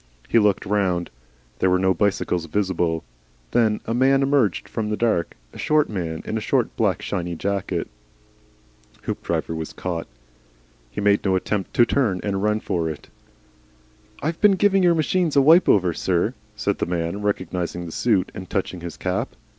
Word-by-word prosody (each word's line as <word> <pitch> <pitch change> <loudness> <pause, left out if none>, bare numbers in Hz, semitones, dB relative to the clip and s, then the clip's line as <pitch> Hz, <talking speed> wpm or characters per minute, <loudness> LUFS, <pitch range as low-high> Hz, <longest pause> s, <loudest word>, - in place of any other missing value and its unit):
He 115 - +4
looked 105 -2 +2
round. 95 -4 0 0.5
There 95 - +3
were 90 - +3
no 95 0 +2
bicycles 90 -2 0
visible. 90 -3 0 0.5
Then 110 -3 +2
a 115 - -2
man 135 +3 +3
emerged 135 -9 +1
from 110 -2 -3
the 105 - -1
dark, 110 -8 0 0.2
a - - -11
short 155 -1 +2
man 85 -5 -4
in - - -2
a - - -8
short, - - 0
black, - - 0
shiny 85 -1 -3
jacket. 95 -1 -2 1.2
Hoopdriver - - -2
was 80 -1 -5
caught. 85 -2 -4 0.8
He 105 - -5
made 100 0 +3
no 95 -2 +2
attempt 95 +1 -2
to 120 - +6
turn 115 -8 +1
and 100 -2 -1
run 105 +1 +1
for 85 -2 -1
it. 75 -2 -8 1.1
"I've 160 +3 -2
been 210 -1 +6
giving 195 0 +3
your 175 -2 +4
machines 165 0 +1
a 140 - +6
wipe 165 +6 +6
over, 90 -4 +4
sir," 95 +7 0 0.2
said 105 -1 -1
the - - -1
man, 85 +3 -2
recognising 90 -3 -2
the 85 - -7
suit, 100 -1 +1
and 95 - -8
touching 95 -3 -2
his 85 -1 -7
cap. - - -2
100 Hz, 170 wpm, -23 LUFS, 90-115 Hz, 1.2 s, to